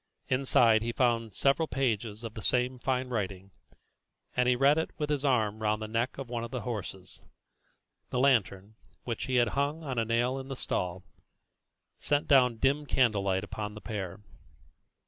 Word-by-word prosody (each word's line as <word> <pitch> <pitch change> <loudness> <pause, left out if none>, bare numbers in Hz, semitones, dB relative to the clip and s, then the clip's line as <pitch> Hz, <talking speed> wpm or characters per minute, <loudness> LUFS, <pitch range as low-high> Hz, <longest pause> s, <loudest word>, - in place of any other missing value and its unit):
Inside 125 -4 +4
he 115 +1 -1
found 115 -4 0
several 140 +4 +2
pages 115 -5 -1
of 115 -2 -6
the 110 - -7
same 125 +3 0
fine 130 0 -1
writing, 100 -4 -4 0.8
and 125 0 +3
he 125 - +4
read 140 +4 +4
it 160 - -2
with 150 -1 -2
his 145 -2 0
arm 110 -6 +1
round 105 0 +1
the 110 - -5
neck 115 +3 -1
of 135 -2 -6
one 120 -1 -3
of 115 - -5
the 125 -1 -4
horses. 95 -5 -6 0.9
The - - -3
lantern, 110 -6 +2 0.3
which 115 -2 -3
he 130 - -1
had 120 -2 +4
hung 145 +5 -1
on 130 -5 -2
a 115 - +1
nail 120 +4 +1
in 135 - -8
the 135 - -5
stall, 90 -6 -2 1.0
sent 145 0 +1
down 125 -4 +5
dim 140 +5 +1
candlelight 100 -7 +2
upon 105 0 -5
the - - -7
pair. 100 -3 -5
120 Hz, 175 wpm, -29 LUFS, 105-130 Hz, 1.0 s, down